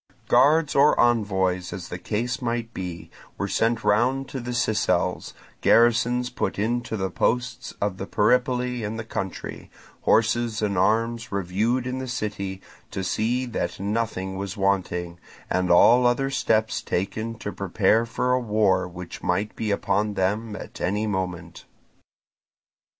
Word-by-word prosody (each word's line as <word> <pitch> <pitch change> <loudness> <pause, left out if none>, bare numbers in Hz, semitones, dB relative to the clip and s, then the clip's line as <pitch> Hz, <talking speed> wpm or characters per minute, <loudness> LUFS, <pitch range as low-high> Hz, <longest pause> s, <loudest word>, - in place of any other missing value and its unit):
Guards 150 +2 +4
or 140 +2 +4
envoys, 95 -6 +2
as 90 -1 -7
the 90 - -5
case 120 +8 -2
might 115 -1 -2
be, 90 -2 -6 0.3
were - - -2
sent 115 0 +1
round 125 +6 +2
to 135 - -5
the 120 0 -6
Sicels, 110 -3 0 0.3
garrisons 120 +1 +3
put - - -2
into 115 +2 -1
the 95 -1 -2
posts 125 +3 -1
of 100 -2 -1
the 95 - -5
Peripoli 125 +3 +1
in 105 +2 -3
the 110 - -4
country, 95 -4 -6 0.3
horses 115 0 +2
and 100 -2 0
arms 115 +5 +1
reviewed 100 +6 0
in 130 0 -3
the 130 - -5
city 100 -5 -4 0.3
to 95 - -4
see 115 +8 0
that 115 -9 -3
nothing 100 -2 -2
was 100 +1 -5
wanting, 90 -3 -1 0.3
and 90 0 +1
all 120 +8 +6
other 135 +3 +1
steps 110 -4 +1
taken 110 +5 -3
to 105 - -5
prepare 100 +3 +2
for 115 +2 -1
a 125 - +3
war 105 -6 +2
which 90 0 -9
might 100 +4 -1
be 110 - -3
upon 105 +1 0
them 105 +3 -1
at - - -9
any 105 +4 0
moment. 90 -4 -4
110 Hz, 145 wpm, -24 LUFS, 95-120 Hz, 0.3 s, all